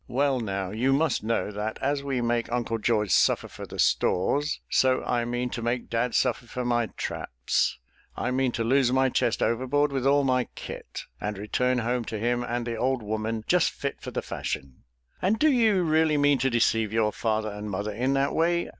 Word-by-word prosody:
Well 135 +1 +1
now, 95 -4 -3
you 125 +5 +1
must 155 +1 +1
know, 110 -1 -1
that 105 +2 -4
as 140 +1 0
we 135 -3 -2
make 120 0 0
Uncle 120 -2 -1
George 105 -3 +1
suffer - - +3
for - - -9
the - - -9
stores, 145 - +1
so 130 -1 +2
I 120 -1 0
mean 120 +1 -2
to 115 - -4
make 120 +1 -2
dad 115 +1 0
suffer 125 -2 +1
for 125 +1 -4
my 120 -1 +1
traps. 60 0 -1 0.4
I 125 - -1
mean 130 0 +1
to 115 - -1
lose 130 +1 +3
my 130 0 +3
chest 120 - +1
overboard 130 +5 +1
with 135 -1 0
all 140 +1 +4
my 130 -2 +2
'kit,' - - -7 0.2
and 105 0 -3
return 125 +5 0
home 120 +1 0
to 110 - -4
him 120 +3 0
and 120 0 -2
the 115 -1 -3
old 130 0 0
woman 110 +1 -3
just - - +3
fit - - -5
for - - -6
the - - -4
fashion." 65 -1 -5 0.4
"And 200 +4 +2
do 305 +5 +4
you 220 -7 +3
really 155 -1 +3
mean 145 -1 +3
to 135 +2 +2
deceive 115 -3 +2
your 110 -1 +2
father 110 -1 -1
and 105 +1 -6
mother 105 +2 -3
in 125 +6 0
that 135 +1 +1
way?" 170 +1 +1
120 Hz, 205 wpm, -26 LUFS, 110-135 Hz, 0.4 s, all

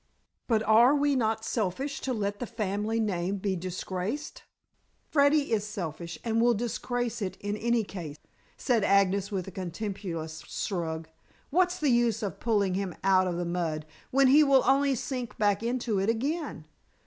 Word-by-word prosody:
"But 220 -3 +2
are 230 +6 +6
we 290 -1 +2
not 220 -3 0
selfish 240 +7 -2
to 265 - -2
let 205 -3 -2
the 245 - -4
family 215 0 -2
name 195 -2 -1
be 195 0 -1
disgraced?" 185 - -4 0.7
"Freddy 285 -1 +3
is 210 -2 +1
selfish, 175 -5 -5
and 230 -1 +1
will 240 0 +4
disgrace 240 +1 -2
it 190 -2 -3
in 205 0 -3
any 235 +1 +1
case," 170 -7 -7 0.4
said 235 -5 +1
Agnes, 200 0 +3
with 190 -3 -3
a - - -6
contemptuous 175 -3 -5
shrug. 165 -4 -3 0.4
"What's 360 +3 +2
the 295 -5 +2
use 235 -2 +2
of 195 -5 -4
pulling 205 -5 +1
him 190 -2 -2
out 190 -1 +4
of 175 -1 -2
the 175 - -2
mud, 165 -3 -2 0.2
when 275 +1 +4
he 285 +4 +7
will 275 -2 +5
only 275 +1 +3
sink 250 -1 -4
back 205 -1 +2
into 235 -3 -1
it 195 +3 +1
again? 270 - -2
215 Hz, 165 wpm, -28 LUFS, 185-245 Hz, 0.7 s, he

